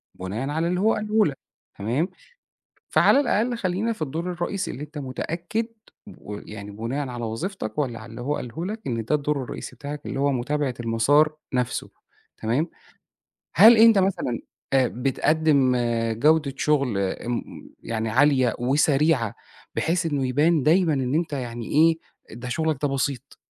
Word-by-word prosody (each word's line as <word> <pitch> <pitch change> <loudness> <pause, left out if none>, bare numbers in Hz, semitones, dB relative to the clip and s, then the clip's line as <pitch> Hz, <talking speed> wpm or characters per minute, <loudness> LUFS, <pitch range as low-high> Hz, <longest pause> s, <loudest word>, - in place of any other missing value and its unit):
بناءً 105 +9 -4
على 160 +3 0
اللي 180 +1 0
هو 220 +3 +3
قاله 215 0 +2
لك، 140 -5 -2 0.4
تمام، 125 - -1 0.8
فعلى 275 - +5
الأقل 240 -3 +1
خلّينا 200 +3 -1
في 215 - -17
الدور 160 +5 -2
الرئيسي 180 +2 -3
اللي 140 - -7
أنت 150 +1 -10
متأكد 170 - -3 0.5
ويعني 105 0 -8
بناءً 120 +7 -3
على 120 -1 -5
وظيفتك 115 - -4
والّا 130 -6 -1
على 110 - -11
اللي - - -8
هو 145 +4 -1
قاله 125 +7 -5
لك، 215 +3 -4
إن 115 -3 -2
ده 150 - +2
الدور 145 -1 -1
الرئيسي - - -7
بتاعك 145 +1 -7
اللي - - -4
هو 140 +1 +2
متابعة 135 +1 -1
المسار 135 +7 +3 0.2
نفسه، 125 -1 -1 0.5
تمام. 120 +9 0 0.9
هل 220 +6 +9
أنت 225 -1 +7
مثلًا 185 -11 0 0.3
آآ، 130 -2 +4
بتقدم 135 +1 +2 0.4
جودة 150 0 +3
شغل 140 -8 +1
أم 100 +5 -2 0.4
يعني 110 -1 -2
عالية 130 0 +3
وسريعة 135 -2 +2 0.4
بحيث 165 +2 0
إنه 145 -5 0
يبان 150 +4 +2
دايمًا 165 +1 +4
إن 130 0 0
أنت 160 -2 -1
يعني 120 -4 -4
إيه، 160 +2 +5 0.4
ده 125 +1 -6
شغلك 160 +2 0
ده 145 - +2
بسيط، 135 -2 -3
145 Hz, 155 wpm, -24 LUFS, 125-165 Hz, 0.9 s, هل